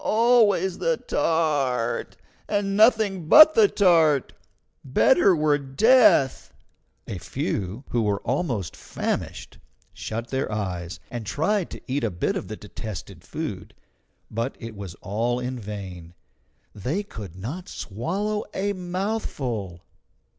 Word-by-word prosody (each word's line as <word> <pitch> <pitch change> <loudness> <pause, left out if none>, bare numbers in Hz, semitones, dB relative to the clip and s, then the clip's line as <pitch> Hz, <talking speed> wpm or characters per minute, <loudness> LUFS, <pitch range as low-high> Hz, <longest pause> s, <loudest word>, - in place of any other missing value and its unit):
Always 215 -6 +3
the - - +1
tart, 140 -8 0 0.3
and 200 -1 0
nothing 215 -6 +3
but 310 - +9
the 440 -2 +6
tart! 165 - +3 0.5
Better 185 - +4
were 150 -2 +2
death!" 175 - +4 0.5
A - - -6
few, 100 +7 -3
who 120 - 0
were 105 -2 0
almost 120 - -2
famished, - - -4 0.3
shut 115 +2 -5
their 130 -3 -2
eyes, 90 -5 -4
and 120 -2 -4
tried 165 - 0
to - - -9
eat 135 0 -2
a 115 - +1
bit 85 -3 -2
of - - -4
the - - -6
detested 95 -4 -8
food; 105 - -6 0.6
but 115 +4 -2
it 115 -2 -8
was 100 -4 -8
all 115 +5 -1
in 125 0 -4
vain 95 -5 -8 0.6
they 135 - -2
could 105 - -9
not 135 - -6
swallow 195 - -3
a 200 +1 0
mouthful. 175 - -3
135 Hz, 125 wpm, -24 LUFS, -, 0.6 s, but